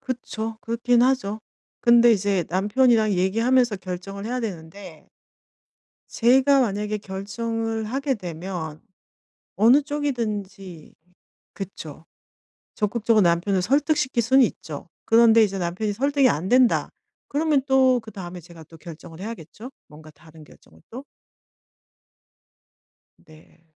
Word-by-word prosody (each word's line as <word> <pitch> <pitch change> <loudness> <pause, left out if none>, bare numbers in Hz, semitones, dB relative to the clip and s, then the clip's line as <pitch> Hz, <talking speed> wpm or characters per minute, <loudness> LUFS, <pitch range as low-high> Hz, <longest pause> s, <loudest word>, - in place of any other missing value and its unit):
그쵸. 225 -4 -5
그렇긴 235 +1 +1
하죠. 245 -5 0 0.4
근데 235 0 +5
이제 200 -3 0
남편이랑 215 +4 +2
얘기하면서 225 +5 +1
결정을 190 +2 -7
해야 250 +2 -3
되는데 175 -4 -8 1.1
제가 265 +3 +4
만약에 210 -1 -2
결정을 225 +3 -4
하게 270 +5 -2
되면 170 -4 -7 0.7
어느 235 +9 +5
쪽이든지 210 - -5 0.6
그쵸. 165 -5 -9 0.7
적극적으로 215 +1 +1
남편을 180 +2 +1
설득시킬 270 - +1
수는 260 +4 +4
있죠. 160 -7 -6 0.2
그런데 225 0 +5
이제 195 -2 -3
남편이 185 +4 -2
설득이 275 +4 +2
안된다 240 +8 +2 0.4
그러면 295 -1 +1
또 260 -2 +3
그다음에 190 -5 -9
제가 170 -1 -14
또 165 - -16
결정을 165 +1 -12
해야겠죠? 220 - -9 0.2
뭔가 155 +1 -15
다른 155 +1 -18
결정을 80 - -21
또. 255 +4 -9 2.2
네. 160 +1 -20
215 Hz, 265 characters per minute, -23 LUFS, 180-245 Hz, 2.2 s, 근데